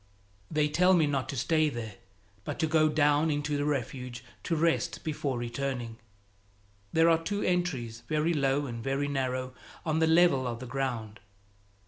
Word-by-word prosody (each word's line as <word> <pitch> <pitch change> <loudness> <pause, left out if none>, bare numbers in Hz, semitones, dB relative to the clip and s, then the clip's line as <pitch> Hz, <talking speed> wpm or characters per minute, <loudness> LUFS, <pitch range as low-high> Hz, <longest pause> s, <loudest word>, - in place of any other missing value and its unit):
They 150 -1 +2
tell 180 +5 +4
me 165 -3 +4
not 140 -3 -1
to - - -3
stay 155 +4 +2
there, 115 -6 -6 0.5
but - - -5
to 160 - +1
go 155 0 +3
down 150 +1 +3
into 145 0 -1
the 145 0 0
Refuge 125 -3 -3 0.2
to 165 - -1
rest 165 +1 0
before 145 -5 -2
returning. 120 -1 -3 0.9
There 165 +1 +4
are 165 -1 +4
two 205 +4 -2
entries, 135 -11 -1
very 155 +2 +1
low 140 -1 +1
and 115 -3 -6
very 135 +1 -1
narrow, 130 -2 -2 0.3
on 160 -1 +1
the 160 - +3
level 160 -6 +4
of 120 -1 -4
the 130 - -7
ground. 120 -4 -3
145 Hz, 165 wpm, -29 LUFS, 130-160 Hz, 0.9 s, tell